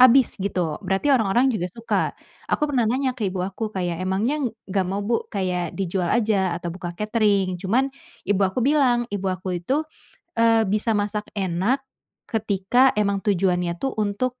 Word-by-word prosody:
habis 255 0 +7
gitu, 180 -5 -1
berarti 195 +8 +1
orang-orang 245 +2 +3
juga 180 -5 -2
suka. 230 +5 -1 0.4
Aku - - +1
pernah 260 -7 +1
nanya 260 +2 +1
ke 225 -6 -2
ibu 185 -1 -2
aku 195 +4 -3
kayak, 180 -4 -3
"Emangnya 200 +11 0 0.2
nggak 195 0 0
mau 200 +2 -2
Bu 230 +2 -1
kayak 185 -4 -2
dijual 185 -2 -1
aja 200 -5 +2
atau 175 -1 -5
buka 175 -1 -7
katering?" 205 -4 +1
Cuman 255 +9 +1 0.3
ibu 205 -1 +1
aku 195 +5 +1
bilang. 260 -4 +3
Ibu 195 -1 -2
aku 185 -1 -3
itu, 275 - 0 0.6
eee, 225 -1 +5
bisa 215 +2 +1
masak 210 +1 -2
enak 195 +8 0 0.4
ketika 220 +3 +2
emang 200 -2 +1
tujuannya 180 -3 +1
tuh 270 +9 -2
untuk, 235 +5 -1
205 Hz, 165 wpm, -23 LUFS, 185-235 Hz, 0.6 s, habis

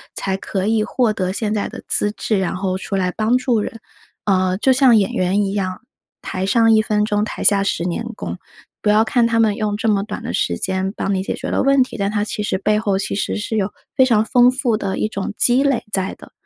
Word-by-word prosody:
才 190 -1 -2
可 190 0 -3
以 220 0 +2
获 235 -1 0
得 185 -2 -2
现 210 +2 -2
在 210 - -2
的 - - -10
资 205 - +2
质， 215 -1 -1
然 185 -1 -2
后 185 0 -2
出 195 +1 -5
来 185 -1 0
帮 225 +5 +1
助 245 -3 +1
人。 225 +2 -5 0.5
呃， 185 -2 +1
就 260 +4 +3
像 255 -4 +5
演 195 -2 +1
员 185 +3 +1
一 195 -1 -2
样， 185 -2 -3 0.4
台 185 - -4
上 225 +2 +4
1 220 - +5
分 210 -1 0
钟， 210 -1 0
台 - - -5
下 200 -1 +5
10 190 -3 -1
年 180 +6 -2
功。 - - -6 0.4
不 210 - +1
要 210 +1 +5
看 235 +1 +2
他 230 0 +1
们 220 -2 +3
用 210 -2 -1
这 225 - -2
么 205 -2 +2
短 215 - -7
的 - - -4
时 - - 0
间 190 0 -1
帮 195 - -1
你 190 - 0
解 - - -3
决 - - -5
了 - - 0
问 275 -1 +4
题， - - -9
但 200 0 -1
他 205 -1 -1
其 210 - -4
实 195 -2 -1
背 210 +2 +1
后 200 -3 0
其 195 - -3
实 200 - -2
是 215 +1 -3
有 200 0 -1 0.2
非 260 - +5
常 220 -4 +2
丰 245 +1 +5
富 255 -3 0
的 200 -3 -3
一 - - 0
种 200 -1 -5
积 250 +2 +4
累 275 -4 +1
在 190 -1 -1
的。 - - -15
210 Hz, 265 characters per minute, -19 LUFS, 195-225 Hz, 0.5 s, 像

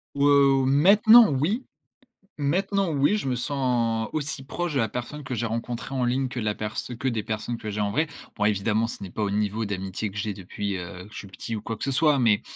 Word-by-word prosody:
Ouais, 140 - +1
ou 140 -2 +5
maintenant 205 - +7
oui 180 - 0 0.8
maintenant 190 +5 +1
oui, 145 +8 +3
je 205 - -3
me 130 - +1
sens 120 -4 0
aussi 145 -3 -3
proche 175 +2 -3
de - - +1
la 115 -3 +1
personne 140 +4 -6
que 130 - -4
j'ai 120 0 -2
rencontrée 115 +3 -4
en 130 -2 0
ligne 130 +2 0
que 125 - -6
la 105 -2 -1
pers 105 0 -5 0.2
que 130 - -1
des 115 -4 -2
personnes 110 +3 -3
que 110 - -7
j'ai 105 0 -3
en 105 - 0
vrai. 155 +10 +1 0.3
Bon 105 - 0
évidemment, 105 +2 +1
ce 115 - -7
n'est 95 - -6
pas 105 - -2
au 100 - -1
niveau 105 +2 -1
d'amitié 95 +1 -3
que 100 - -13
j'ai 105 0 -2
depuis, 100 +1 -4
heu, 90 +1 -8
que 105 - -17
je - - -8
suis - - -8
petit 105 +4 -6
ou - - -4
quoi 115 +1 -4
que - - -11
ce 140 - 0
soit, 145 +1 +3
mais 110 -4 +3
120 Hz, 245 wpm, -25 LUFS, 105-140 Hz, 0.8 s, maintenant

